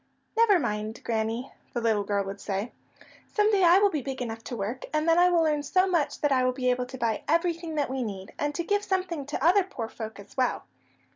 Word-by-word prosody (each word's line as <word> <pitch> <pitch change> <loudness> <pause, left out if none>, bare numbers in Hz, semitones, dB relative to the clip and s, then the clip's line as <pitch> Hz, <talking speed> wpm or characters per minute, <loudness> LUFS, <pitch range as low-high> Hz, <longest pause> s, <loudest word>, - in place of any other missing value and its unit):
"Never 450 -4 +5
mind, 215 -5 -3
Granny," 225 +2 -2 0.2
the 240 - -1
little 220 -3 +1
girl 200 0 0
would 195 +1 -7
say. 200 +3 -3 0.6
"Some 425 0 +2
day 395 -3 +3
I 345 +1 +7
will 405 0 +4
be 300 - -1
big 265 0 -5
enough 225 -2 -5
to 245 - -5
work, 225 +4 -4
and 305 +1 0
then 330 +1 +5
I 360 0 +6
will 340 -2 +3
earn 300 -1 +1
so 370 +6 +2
much 345 -6 0
that 295 - +2
I 260 -1 +3
will 255 0 +2
be 250 -1 +1
able 250 0 -1
to 260 - -8
buy 230 -3 -1
everything 335 0 0
that 290 -2 +1
we 265 0 -3
need, 195 -5 -6
and 290 0 -1
to 340 - -1
give 410 +4 0
something 360 -8 -2
to 290 0 -2
other 375 +4 +5
poor 255 -12 -6
folk 220 -2 -8
as 200 - -13
well." 255 -1 0
270 Hz, 240 wpm, -27 LUFS, 225-340 Hz, 0.6 s, I